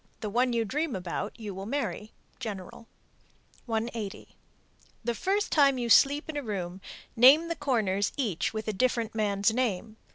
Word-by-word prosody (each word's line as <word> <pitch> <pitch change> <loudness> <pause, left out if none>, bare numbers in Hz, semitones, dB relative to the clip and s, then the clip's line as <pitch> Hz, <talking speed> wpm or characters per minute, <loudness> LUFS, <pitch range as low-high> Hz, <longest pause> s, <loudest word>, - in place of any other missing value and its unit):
The 210 -2 -3
one 245 +3 +2
you 230 -1 0
dream 290 +3 -2
about 190 +4 -4
you 210 -3 -6
will 195 +2 -7
marry. 220 -6 -3 0.3
General. 215 -1 -7 0.8
180. 225 -2 -4 0.7
The 235 +1 0
first 395 - -1
time 280 -3 +4
you 240 -1 -2
sleep 285 +4 +5
in 315 - -6
a 290 - -1
room 190 -6 -5 0.3
name 280 +8 +7
the 335 - -1
corners 215 -9 0
each 220 - -1
with 220 0 -5
a 215 - -1
different 235 +1 0
(man's) 205 -1 +1
name. 220 -3 -2
225 Hz, 160 wpm, -28 LUFS, 205-260 Hz, 0.8 s, name